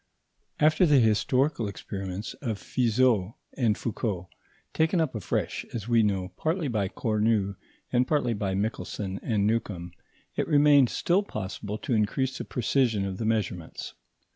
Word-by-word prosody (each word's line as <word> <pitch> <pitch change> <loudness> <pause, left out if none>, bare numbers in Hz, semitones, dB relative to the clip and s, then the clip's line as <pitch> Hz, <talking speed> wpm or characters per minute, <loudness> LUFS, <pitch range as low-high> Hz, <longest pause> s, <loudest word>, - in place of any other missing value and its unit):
After 155 +4 +4
the 145 -2 +5
historical 125 +3 +2
experiments 100 0 -5
of 115 -7 -2
Fizeau 115 -3 +1 0.2
and 115 -5 +2
Foucault, 105 -6 -3 0.4
taken 160 +3 +2
up 160 -5 0
afresh, 105 -6 -2
as 115 -2 -4
we 120 -1 +4
know, 95 -4 0
partly 160 0 0
by 105 -6 0
Cornu, 105 -1 0 0.4
and 125 +1 +3
partly 140 -6 +1
by 100 -3 -2
Michelson 100 -2 -3
and 105 -4 0
Newcomb, 100 -6 -1 0.4
it - - -1
remained 145 -3 +6
still 180 +3 +2
possible 105 - -5
to 115 - -3
increase 130 +5 +1
the - - -5
precision 120 -4 +1
of 95 -1 -4
the 110 - -2
measurements. 100 -7 -2
110 Hz, 140 wpm, -27 LUFS, 100-130 Hz, 0.4 s, remained